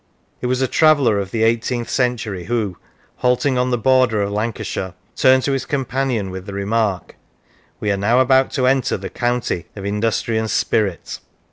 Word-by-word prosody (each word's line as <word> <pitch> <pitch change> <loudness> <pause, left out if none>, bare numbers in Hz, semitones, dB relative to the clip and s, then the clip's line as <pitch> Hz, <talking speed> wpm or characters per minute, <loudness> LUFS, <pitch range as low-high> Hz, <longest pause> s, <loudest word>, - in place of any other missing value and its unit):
It 125 - -1
was 130 +1 0
a - - +2
traveller 140 -9 +4
of 100 -2 -4
the 110 +2 -1
eighteenth 115 +1 0
century 115 -8 -1
who, 110 -6 -1 0.4
halting 125 +1 +1
on 125 0 +1
the 120 - +1
border 125 -3 +3
of 100 - -3
Lancashire, 105 -3 -3 0.2
turned 130 0 +4
to 140 - 0
his 135 -1 -2
companion 130 -6 -1
with 95 +1 -8
the 100 - -6
remark: 100 -1 -1 0.3
" - - -35
We 105 - 0
are 100 - 0
now 115 +6 +2
about 130 0 +4
to 130 -3 +1
enter 130 -1 +2
the 95 0 -7
county 120 -8 -2
of 100 -2 -7
industry 110 +2 0
and 110 0 -2
spirit." 100 -6 -1
115 Hz, 180 wpm, -19 LUFS, 100-130 Hz, 0.4 s, traveller